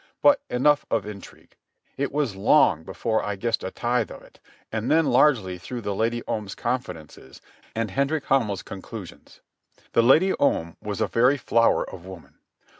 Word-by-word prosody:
But 285 -1 +6
enough 145 +4 +3
of - - 0
intrigue. 105 -2 -11 0.4
It 140 +1 -2
was 140 -8 -1
long 90 -4 +4
before 95 +5 -2
I 105 0 -2
guessed 115 +2 -1
a 95 - -3
tithe 120 +2 -1
of - - -11
it, - - -20 0.3
and 110 +2 -2
then 160 +1 +4
largely 105 -14 +3
through 120 +6 -6
the 100 -2 -3
Lady 115 +3 -1
Om's 105 -3 -4
confidences 80 - -5 0.4
and 115 -3 -2
Hendrik 140 +4 0
Hamel's 110 -8 +1
conclusions. 100 -1 -10 0.5
The - - +5
Lady 155 +11 +5
Om 85 -12 +1
was 105 -1 -4
a - - +2
very 125 +5 +3
flower 115 -3 +2
of 90 -3 -10
woman. 95 -3 -12
115 Hz, 165 wpm, -24 LUFS, 95-135 Hz, 0.5 s, But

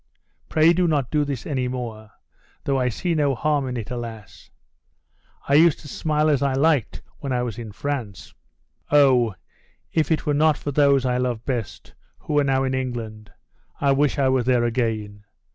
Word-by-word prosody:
Pray 160 +2 +4
do 180 0 +2
not 145 -7 0
do 150 -1 +2
this 140 -4 -4
any 130 -5 -1
more; 115 -4 -6 0.5
though 135 -1 0
I 125 -1 +1
see 170 - -2
no 145 -4 +1
harm 145 +1 0
in 125 -1 -4
it; 115 -1 -6
alas! 110 -6 -8 1.0
I 140 - +1
used 160 +1 +5
to 150 - -11
smile 155 +1 0
as 145 -3 +2
I 140 -1 +1
liked 145 -2 +1 0.2
when 140 - -5
I 125 -1 0
was 120 -2 -5
in 115 -3 -7
France. 120 -5 -5 0.6
Oh, 130 -7 +4 0.6
if 160 -2 +1
it 160 - 0
were 150 - +1
not 155 0 +3
for 145 - -4
those 140 -2 +3
I 125 -1 +1
love 125 -3 -2
best, 120 -8 -5 0.2
who 145 - -1
are - - +3
now 135 -1 +1
in 130 0 -1
England, 115 -5 -4 0.5
I 140 -1 +2
wish 145 +2 +2
I 135 -2 +2
were 130 -1 +2
there 125 0 +2
again! 110 -4 -2
130 Hz, 185 wpm, -23 LUFS, 120-145 Hz, 1.0 s, used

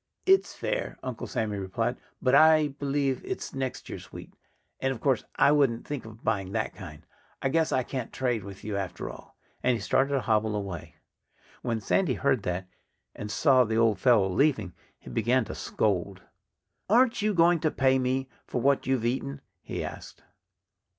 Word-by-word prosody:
"It's 385 0 +4
fair," - - -3
Uncle 130 -3 -5
Sammy 105 -2 -2
replied. 115 +6 -1 0.3
"But 130 - +3
I 155 0 +6
believe 140 -1 -1
it's - - -5
next 130 -1 -4
year's - - -8
wheat. - - -10 0.5
And 135 - 0
of 130 - -5
course 135 -5 +1
I - - +5
wouldn't 135 -6 +2
think 145 -5 -5
of 110 0 -12
buying 100 -3 -1
that - - -1
kind.... - - -10 0.3
I 135 - 0
guess 160 +2 +1
I 130 - +2
can't 130 -2 -5
trade 120 -5 -1
with 100 -1 -10
you, 105 -1 -3
after 95 -2 -4
all." - - -14 0.2
And 125 -1 +2
he - - -3
started 135 +4 +1
to 135 - +1
hobble 110 -1 +1
away. 100 -6 -5 0.7
When 115 -2 -1
Sandy 145 - +1
heard 135 -4 +1
that, 90 0 -3 0.5
and 105 - -6
saw 130 +4 +4
the 110 -1 -1
old 115 -4 +3
fellow 110 -4 +4
leaving, 110 - +1 0.2
he - - -12
began 120 +2 +2
to - - -6
scold. 95 -2 -1 0.7
"Aren't 235 +2 +4
you 210 -1 +1
going 170 0 +5
to 155 - +1
pay 130 -2 +2
me 130 +1 0 0.2
for - - -2
what 140 +2 +2
you've 130 -3 +1
eaten?" 135 +3 -2 0.2
he - - -4
asked. - - -9
125 Hz, 180 wpm, -28 LUFS, 110-140 Hz, 0.7 s, I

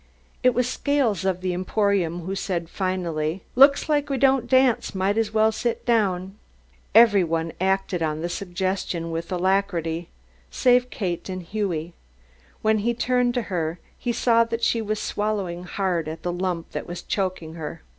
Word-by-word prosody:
It 255 -1 +4
was 250 0 +2
Scales 255 - 0
of 185 -1 0
the 185 -1 -1
Emporium 185 -2 0
who 185 +3 -4
said, 180 -3 -3
finally: 175 -3 -2
"Looks 275 +3 +6
like 295 -1 +1
we 275 - 0
don't 265 -2 +3
dance 260 -5 +3
might 190 +2 +1
as 225 -1 0
well 220 0 +3
sit 235 +1 -2
down." 195 -4 0 0.6
Every 220 -4 +7
one 165 -1 -2
acted 190 -2 0
on 155 -1 -1
the 170 - -1
suggestion 180 -2 -3
with 165 +2 -4
alacrity 175 -3 0 0.4
save 250 -1 +3
Kate 180 -5 -3
and 185 -1 -4
Hughie. 175 -4 -3 0.7
When 220 0 +3
he 235 +3 0
turned 250 0 +1
to 245 - 0
her, 165 -1 -1 0.2
he 245 - -2
saw 230 0 +3
that 230 0 -4
she 230 0 +2
was 215 0 -2
swallowing 195 -4 -2
hard 180 -4 -1
at 160 +1 -6
the 175 - -1
lump 180 -2 -3
that - - -5
was 175 0 -6
choking 185 -5 -2
her. 160 0 -7
190 Hz, 165 wpm, -24 LUFS, 175-230 Hz, 0.7 s, Every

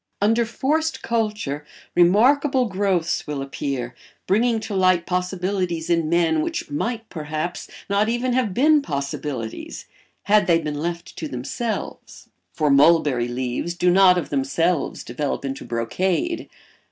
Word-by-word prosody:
Under 225 +3 +2
forced 310 +7 -1
culture 210 -11 -2 0.3
remarkable 255 +9 +4
growths 190 -5 0
will 150 -2 -3
appear, 135 -2 -4 0.3
bringing 225 +3 +2
to 215 - -5
light 185 -3 +3
possibilities 180 -2 -2
in 165 -2 +2
men 165 -2 +2
which 150 - -4
might, 225 +9 -2
perhaps, 155 +2 -4 0.2
not 200 +2 +1
even 240 +2 0
have 245 -5 +1
been 295 +8 +4
possibilities 140 - -5 0.4
had 210 +1 +3
they 170 -2 +5
been 150 -3 -4
left 170 +2 -4
to 160 - -4
themselves; 150 - -5 0.2
for 150 -2 +1
mulberry 140 -4 +4
leaves 125 +7 -3
do 180 0 +3
not 185 0 +6
of 175 - -3
themselves 145 +4 0
develop 140 +3 -3
into 135 0 -4
brocade. 185 - -1
175 Hz, 130 wpm, -22 LUFS, 150-215 Hz, 0.4 s, not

